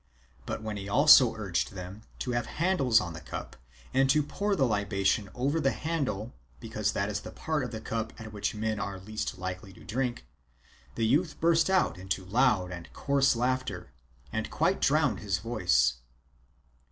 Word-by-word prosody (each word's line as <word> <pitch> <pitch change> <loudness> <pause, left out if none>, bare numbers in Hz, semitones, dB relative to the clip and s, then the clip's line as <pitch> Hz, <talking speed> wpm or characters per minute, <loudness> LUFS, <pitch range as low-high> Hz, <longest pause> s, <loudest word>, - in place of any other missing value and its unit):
_But - - -4
when 110 -1 -4
he 100 0 -6
also 135 0 +7
urged 95 -3 -2
them 95 +2 -8 0.2
to 125 - -3
have 120 -1 -1
handles 150 -9 +3
on 85 -5 -4
the 80 - -8
cup, - - -7 0.4
and 135 0 +3
to 150 +2 +4
pour 200 +7 -1
the 140 -7 +3
libation 100 -2 0
over 140 +6 0
the 135 - +2
handle, 135 -9 -2 0.3
because 110 -2 -2
that 100 - 0
is 105 0 -2
the - - -9
part 155 -3 -2
of 125 - -3
the 110 -2 -6
cup 110 0 -3
at 110 -1 -9
which 105 +1 -2
men 110 0 -1
are 100 -2 -4
least 110 +1 -4
likely 90 +2 -5
to - - -15
drink, 120 - -2 0.7
the 115 - 0
youth 155 +9 +1
burst 165 +1 +3
out 190 - +2
into 95 0 -3
loud 105 -3 +2
and 85 -2 -8
coarse 140 -2 +2
laughter, 120 - -2 0.4
and 110 - -2
quite 175 +5 +1
drowned. 145 -7 +2
his 100 -3 -1
voice. 90 - +2
110 Hz, 175 wpm, -29 LUFS, 100-135 Hz, 0.7 s, also